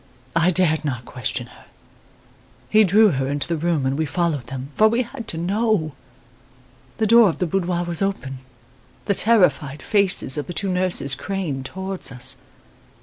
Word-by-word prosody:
I 165 +2 +3
dared 170 -4 +2
not 130 -5 -4
question 125 -3 -3
her. - - -18 1.1
He 215 0 +6
drew 210 +3 +5
her 135 -5 -1
into 145 +1 -2
the 170 - -1
room 160 -3 -1
and 135 +3 -1
we 160 - 0
followed 155 -6 -2
them, 135 +2 -7
for 215 - +4
we 230 +3 +1
had 235 -1 -9
to 160 - -5
know! 195 -1 0 1.1
The 220 - +1
door 230 -1 +6
of 165 - -4
the 180 - -1
boudoir 175 0 -1
was 175 0 -4
open. 140 -10 -3 0.7
The 200 - +2
terrified 165 - +2
faces 190 - +2
of 145 - -5
the 175 - -6
two 195 +3 -1
nurses 180 -7 +1
craned 155 -8 -4
towards 190 -2 -3
us. 130 +1 -1
175 Hz, 170 wpm, -21 LUFS, 140-195 Hz, 1.1 s, He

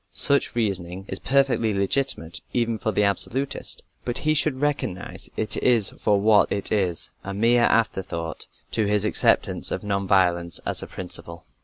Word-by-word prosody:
Such 140 -3 +6
reasoning 95 -4 -3
is - - -4
perfectly 130 -5 +1
legitimate, 100 -4 -1
even 115 -2 -1
for 110 - -2
the 105 - +1
"absolutist," 130 +7 -1 0.2
but 120 - -4
he 155 - +3
should 150 -3 +1
recognize 140 -10 -3
it 105 -3 -1 0.5
for 105 -2 +2
what 105 0 +3
it 100 - -3
is 95 -6 -1
a 100 0 -6
mere 120 +3 +3
afterthought 95 -7 -2 0.2
to 110 -2 0
his 105 0 +1
acceptance - - +2
of - - -4
non 100 -1 -2
violence 85 -3 +2
as - - -1
a - - -7
principle. 85 -2 -3
105 Hz, 155 wpm, -23 LUFS, 95-120 Hz, 0.5 s, Such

